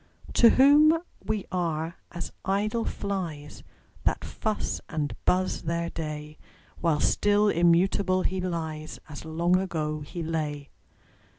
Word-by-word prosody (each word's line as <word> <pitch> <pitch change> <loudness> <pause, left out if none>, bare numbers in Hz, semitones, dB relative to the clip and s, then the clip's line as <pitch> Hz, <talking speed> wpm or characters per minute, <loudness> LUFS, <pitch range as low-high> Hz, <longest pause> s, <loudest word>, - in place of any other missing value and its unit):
To 235 - +7
whom 295 +6 +6 0.3
we 215 -2 -2
are 165 -2 -1 0.2
as 175 0 -5
idle 210 +4 0
flies, 170 -8 -4 0.4
That - - 0
fuss 215 -1 -2
and 150 -3 -2
buzz 185 +1 +1
their 170 +1 -2
day; 150 -1 -6 0.4
While 160 -3 +1
still 205 0 +3
immutable 185 +2 +3
he 185 0 -1
lies, 160 -3 -4
As 155 +1 -8
long 170 +3 +2
ago 155 -5 -2
he 165 +4 -6
lay. 150 -3 -3
170 Hz, 120 wpm, -27 LUFS, 155-195 Hz, 0.4 s, To